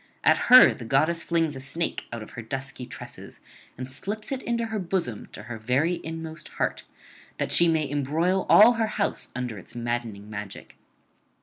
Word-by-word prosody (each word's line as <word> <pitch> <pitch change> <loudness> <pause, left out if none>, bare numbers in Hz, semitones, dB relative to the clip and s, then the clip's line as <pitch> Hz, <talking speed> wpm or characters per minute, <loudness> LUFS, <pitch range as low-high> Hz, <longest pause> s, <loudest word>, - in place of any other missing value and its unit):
At - - +3
her 255 +1 +9
the - - -10
goddess 155 +8 +1
flings 165 -4 0
a - - -6
snake 165 +5 -1
out 115 -2 -5
of - - -13
her 115 - -7
dusky 130 +2 -5
tresses, - - -9 0.4
and 130 +1 -5
slips 210 - -6
it 265 -1 -2
into 235 -1 -1
her 220 -1 -3
bosom 170 - -3
to - - -9
her 115 0 -7
very 135 +10 0
inmost 160 -1 -7
heart, - - -2 0.5
that - - -2
she 170 - +6
may 160 -3 +1
embroil 155 +7 0
all 220 +4 +8
her 225 -1 0
house 200 - -1
under 125 -5 -4
its 90 - -14
maddening 120 -4 -4
magic. 105 -2 -8
150 Hz, 180 wpm, -26 LUFS, 120-175 Hz, 0.5 s, her